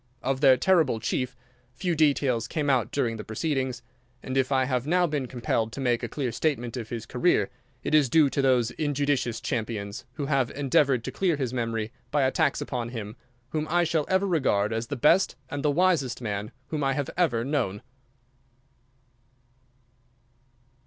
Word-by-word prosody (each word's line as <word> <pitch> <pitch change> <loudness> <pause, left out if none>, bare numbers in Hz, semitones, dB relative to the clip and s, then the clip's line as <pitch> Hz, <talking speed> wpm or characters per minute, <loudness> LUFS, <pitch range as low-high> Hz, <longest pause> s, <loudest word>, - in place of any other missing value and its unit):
Of 135 +1 -1
their 135 -3 +7
terrible 160 -7 +3
chief 125 +3 -2 0.4
few 180 +4 -1
details 140 -7 +2
came 145 -3 0
out 120 -4 +1
during 120 -5 0
the 105 - -6
proceedings, 130 +1 -2 0.4
and 130 - -4
if 135 +1 +1
I 130 -1 +3
have 130 0 -1
now 180 +2 +3
been 145 -5 -2
compelled 115 -2 -1
to - - -6
make 120 -3 +1
a - - -2
clear 135 -5 -2
statement 120 -4 -1
of 115 -3 -5
his 115 -2 -5
career - - +1 0.3
it - - -2
is 150 -4 +5
due 155 +2 +5
to 140 - 0
those 125 -3 +3
injudicious 145 -5 -1
champions 110 -3 -4
who 140 - -4
have 135 -4 +1
endeavoured 135 -2 +2
to - - -4
clear 180 -4 +1
his 130 -4 -3
memory 115 -2 -2 0.2
by 145 -2 +2
attacks 140 +2 +1
upon 120 -3 -3
him 110 -3 -6 0.3
whom 155 +1 -2
I 175 +2 +3
shall 160 -2 0
ever 190 +1 +2
regard 130 - +1
as 115 +1 -2
the 145 - -3
best 165 +9 +3 0.2
and 145 - -3
the 150 - +2
wisest 150 -6 +2
man 105 -3 -4 0.2
whom 150 -2 -2
I 135 0 +2
have 140 -1 -2
ever 120 -10 +1
known. 130 -9 -1
130 Hz, 175 wpm, -26 LUFS, 115-150 Hz, 0.4 s, their